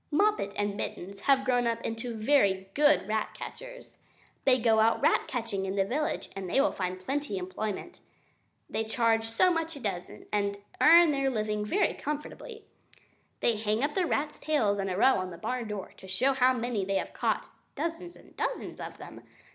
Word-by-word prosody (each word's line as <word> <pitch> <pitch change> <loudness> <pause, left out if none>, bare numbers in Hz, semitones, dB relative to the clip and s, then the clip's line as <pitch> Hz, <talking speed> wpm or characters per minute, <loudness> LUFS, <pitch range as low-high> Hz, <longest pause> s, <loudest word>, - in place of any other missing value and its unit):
Moppet 395 - +2
and 205 -1 -1
Mittens 195 -1 -6
have 270 -1 +5
grown 245 -2 +2
up 230 0 0
into 230 +1 -4
very 205 -6 +2
good 290 -6 +4
rat 215 0 -1
catchers. - - -9 0.5
They 255 -1 +5
go 225 -1 +3
out 225 +1 +4
rat - - +2
catching 225 -6 -3
in 190 - -2
the 195 -1 +2
village, 290 +9 -2
and 190 -2 -5
they - - 0
find 185 -1 -3
plenty 275 +1 -2
of 180 - -3
employment. 215 - -5 0.7
They 220 - -2
charge 225 0 +1
so 230 +11 +3
much 330 -1 -2
a - - -8
dozen 190 -6 -5
and 200 -1 0 0.2
earn 335 0 +8
their 275 -1 +1
living 215 -3 -1
very 375 - +1
comfortably. 300 +10 -6 0.8
They 230 -2 +2
hang 215 +3 0
up 295 +1 0
the 365 0 +1
rats' 300 0 -1
tails 220 -10 +1
in 195 0 -1
a 185 - -2
row 260 +3 +5
on 185 0 -3
the 170 - -9
barn 250 +2 -3
door, 210 -3 -6
to 190 - -12
show 250 +9 +2
how 260 -1 +4
many 240 -4 -1
they 195 +1 -1
have - - -2
caught - - -1 0.2
dozens 340 +1 -4
and - - -18
dozens - - -3
of - - -7
them. - - -10
230 Hz, 190 wpm, -29 LUFS, 200-285 Hz, 0.8 s, earn